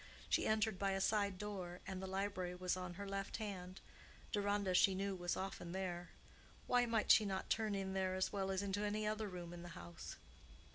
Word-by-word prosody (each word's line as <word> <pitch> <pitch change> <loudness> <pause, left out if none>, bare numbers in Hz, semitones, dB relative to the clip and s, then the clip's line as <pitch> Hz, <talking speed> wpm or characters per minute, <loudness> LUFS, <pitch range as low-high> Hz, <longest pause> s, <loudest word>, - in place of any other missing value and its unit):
She - - +3
entered 215 -3 +2
by 195 -1 +2
a 195 - +1
side 200 -1 +2
door, 185 -3 -4
and 190 -1 -4
the 190 - -3
library 190 -2 -1
was 180 0 0
on 180 -1 -5
her 200 +2 -5
left 195 0 -2
hand; 190 -3 -5 0.5
Deronda, 205 -2 +1
she 190 +1 +6
knew, 195 0 -1
was 175 -1 -1
often 185 -2 -4
there; 180 -2 -3 0.6
why 245 -1 +4
might 225 -2 +4
she 220 - +8
not 190 -2 -2
turn 220 -2 +2
in 190 -1 -2
there 190 -1 +1
as 185 +2 0
well 195 -1 0
as 190 +1 0
into 200 +1 0
any 210 +1 0
other 215 0 0
room 175 -2 -6
in 175 - -7
the 175 - -7
house? 85 -1 -7
195 Hz, 205 wpm, -40 LUFS, 185-205 Hz, 0.6 s, she